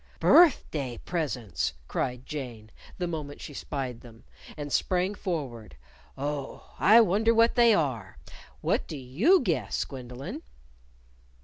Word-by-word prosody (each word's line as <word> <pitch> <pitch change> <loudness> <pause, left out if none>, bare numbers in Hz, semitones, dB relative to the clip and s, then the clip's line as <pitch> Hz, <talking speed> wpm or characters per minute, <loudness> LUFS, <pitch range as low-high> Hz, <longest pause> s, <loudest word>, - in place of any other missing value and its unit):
"Birthday 155 - +4
presents!" 125 - -2
cried 125 0 -3
Jane, 120 -7 -7 0.3
the 180 - -2
moment 155 -4 -5
she 145 - -8
spied 130 -4 -5
them; 115 -2 -15 0.3
and 145 -1 -5
sprang 185 +2 +1
forward. 130 - -5 0.4
"Oh, 140 0 -5
I 225 +3 +7
wonder 220 +3 +3
what 230 +1 +5
they 235 -3 +5
are! 125 - -2 0.4
What - - 0
do 155 - -6
you 175 - +3
guess, - - -1
Gwendolyn?" 125 -1 -8
145 Hz, 120 wpm, -28 LUFS, 125-185 Hz, 0.4 s, I